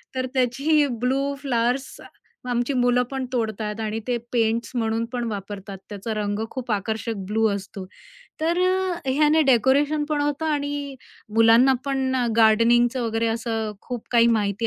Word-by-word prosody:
तर 255 0 -1
त्याची 275 +4 +2 0.2
blue 255 +2 +1 0.2
flowers 250 0 -1 0.6
आमची 245 +3 0
मुलं 245 -1 +2
पण 265 -1 -3
तोडतात 220 -2 -2
आणि 220 0 -2
ते 245 -1 +1
पेंट्स 230 -1 0
म्हणून 225 -1 0
पण 245 -1 -2
वापरतात. 200 -1 -7
त्याचा 205 +2 -5
रंग 205 -1 -2
खूप 250 -3 -5
आकर्षक 220 +3 -2
ब्लू 220 +2 +2
असतो. 195 -1 -7 0.6
तर 335 +3 +1
अ, 370 -5 -1
ह्याने 305 +3 +4
डेकोरेशन 285 +5 +2
पण 300 -1 0
अ, - - 0
होतं 295 +2 -1
आणि 285 -2 -2 0.4
मुलांना 225 +4 +6
पण 270 -2 -1 0.2
गार्डनिंगचं 235 +3 +4
वगैरे 225 0 -1
असं 225 -2 -3
खूप 245 -3 -6
काही 235 -1 +5
माहिती 205 +2 -1
240 Hz, 145 wpm, -23 LUFS, 220-275 Hz, 0.6 s, मुलांना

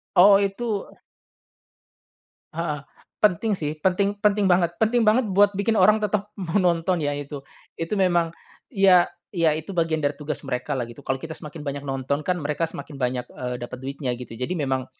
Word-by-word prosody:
Oh 195 +2 +8
itu 200 +1 -2 1.7
Heeh, 155 -3 -3 0.4
penting 210 +1 +2
sih 150 -3 -2
penting 195 +3 +2
penting 210 -1 +3
banget 175 -1 +2
penting 230 +2 +2
banget 230 +5 +5
buat 200 +2 +5
bikin 205 +3 +1
orang 215 - +6
tetap 210 -1 -1
mau 190 +1 0
nonton 175 0 +2
ya 145 - 0
itu 145 0 -6 0.4
itu 165 +5 -2
memang 175 -3 +2 0.4
ya 195 -6 +5 0.3
ya 165 -3 +3
itu 160 +5 -7
bagian 165 -2 +1
dari 145 - +2
tugas 150 -2 -5
mereka 125 +2 -2
lah 125 - -1
gitu 120 +4 -12
kalau 130 - +1
kita 160 +4 -8
semakin 150 0 -8
banyak 140 0 -3
nonton 135 +2 -1
kan 180 +4 -1
mereka 150 +1 -1
semakin 145 -2 -9
banyak, 125 0 -1
eee, 125 -1 -4
dapat 120 +1 -7
duitnya 135 -1 -3
gitu 120 -1 -8
jadi 130 +9 -2
memang 130 -2 -1
165 Hz, 175 wpm, -24 LUFS, 140-195 Hz, 1.7 s, Oh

